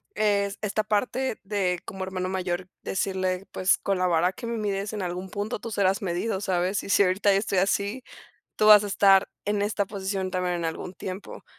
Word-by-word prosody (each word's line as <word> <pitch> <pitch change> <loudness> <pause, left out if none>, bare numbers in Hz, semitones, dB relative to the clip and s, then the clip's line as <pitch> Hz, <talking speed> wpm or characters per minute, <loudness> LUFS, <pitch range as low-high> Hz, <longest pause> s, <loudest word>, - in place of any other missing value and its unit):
es 200 -2 +1
esta 215 0 0
parte 235 +4 0
de 195 -3 0
como 190 -1 -5
hermano 185 -1 -3
mayor, 185 -1 -3
decirle, 185 -1 -1
pues, 185 - +2
con 195 -1 0
la 185 0 +1
vara 175 +1 +2
que 235 +4 -8
me 235 0 -2
mires 205 -1 -2
en 210 - -3
algún 180 +1 -4
punto, 205 +4 -3
tú 230 - -6
serás 195 -2 +1
medido, 190 +2 -1
¿sabes? 190 0 0
Y - - -8
si 200 - +5
ahorita 195 +2 +3
yo 195 - +3
estoy 200 -2 -1
así, 200 +6 0 0.5
tú 215 - +3
vas 210 -1 +9
a 205 - -4
estar 195 -1 +5 0.2
en 205 0 0
esta 205 -1 0
posición 190 -1 -3
también 180 -1 0
en 170 - -4
algún 165 +2 -4
tiempo. 185 +2 -7
195 Hz, 200 wpm, -26 LUFS, 185-205 Hz, 0.5 s, vas